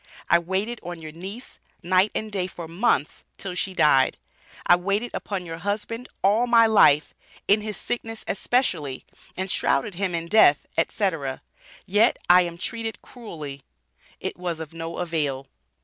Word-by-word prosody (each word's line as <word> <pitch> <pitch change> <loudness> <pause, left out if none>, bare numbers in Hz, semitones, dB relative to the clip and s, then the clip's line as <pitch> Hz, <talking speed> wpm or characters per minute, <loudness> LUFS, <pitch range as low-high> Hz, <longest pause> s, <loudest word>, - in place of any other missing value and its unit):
"I 170 - +7
waited 195 +7 -2
on 175 -1 -7
your 155 -1 -8
niece, 195 +9 -9 0.2
night 185 +3 +3
and 220 0 -3
day 190 -3 -1
for 170 -2 -8
months, 165 - 0
till 190 -2 -5
she 185 +1 -3
died." 150 -5 +4 0.5
"I 175 - +7
waited 200 +6 -1
upon 190 -3 -4
your 165 -1 -7
husband 210 +5 -4
all 215 +5 +3
my 230 -1 +6
life 175 -9 +5 0.3
in 210 +2 +4
his 210 -1 -3
sickness 225 -2 -3
especially, 180 - -1 0.3
and 190 +1 -3
shrouded 140 +9 +1
him 185 -1 -2
in 165 0 -3
death, 170 -6 +5
etc., 165 -6 -1 0.4
yet 205 +5 +3
I 180 +1 +8
am 170 -1 -3
treated 225 +2 -5
cruelly." 155 - -8 0.6
It - - -5
was 175 -3 -3
of 160 -1 -7
no 165 0 -6
avail. 150 -6 -2
185 Hz, 155 wpm, -24 LUFS, 165-210 Hz, 0.6 s, I